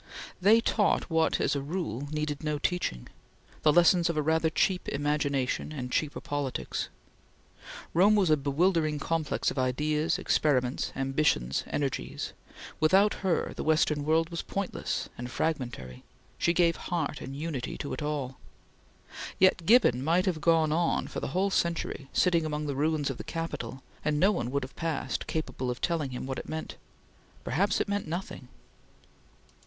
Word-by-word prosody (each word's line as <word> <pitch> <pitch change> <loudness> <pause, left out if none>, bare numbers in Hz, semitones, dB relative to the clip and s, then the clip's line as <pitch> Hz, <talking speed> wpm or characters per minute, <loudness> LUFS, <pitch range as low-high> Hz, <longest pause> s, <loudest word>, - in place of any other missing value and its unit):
They 215 +5 +6
taught 205 -5 +1
what, 160 0 +2
as - - +1
a 140 - -1
rule, 145 - -3
needed 150 -1 -3
no 150 -1 -1
teaching, 145 - -2 0.5
the 150 - +5
lessons 175 +1 +5
of 165 - -1
a - - +3
rather 160 +1 +2
cheap 180 +3 0
imagination 145 -1 -1
and 125 -4 -5
cheaper 150 +1 -1
politics. 145 -3 -3 1.0
Rome 195 +5 +5
was 190 -6 +3
a - - +7
bewildering 155 +2 +1
complex 160 +1 -1
of - - -3
ideas, 150 +5 +1
experiments, 130 -4 +1
ambitions, 135 - +1
energies; 135 - -3 0.5
without 190 +7 +4
her, 185 -4 0
the - - -4
Western 155 -1 +2
world 160 +2 +2
was 170 - -3
pointless 195 -2 -3
and 125 0 -5
fragmentary; 120 - -3 0.4
she 170 - +3
gave 170 -1 +3
heart 160 -4 -2
and 135 - -6
unity 145 -4 -4
to 140 - -4
it - - -5
all; 145 -3 -3 1.0
yet 185 -3 +3
Gibbon 200 - +5
might 170 +5 +2
have 175 -5 -1
gone 160 -2 +3
on 170 +2 +1
for - - -5
the - - -3
whole 195 +2 0
century, 170 -6 -1
sitting 170 -3 +3
among 150 -1 -2
the 140 -2 -2
ruins 150 0 +1
of 130 - -7
the - - -6
Capitol, 135 -6 -5 0.2
and 150 -1 +1
no 190 +5 +5
one 125 - -2
would 140 +1 -1
have 130 - -9
passed, 155 -5 -2
capable 145 -5 -3
of 125 - -3
telling 165 -5 0
him 125 0 -5
what 130 0 -3
it - - -9
meant. 160 0 -5 0.7
Perhaps 195 +9 +1
it - - 0
meant 205 -2 -2
nothing. 165 -5 -5
155 Hz, 160 wpm, -29 LUFS, 140-170 Hz, 1.0 s, a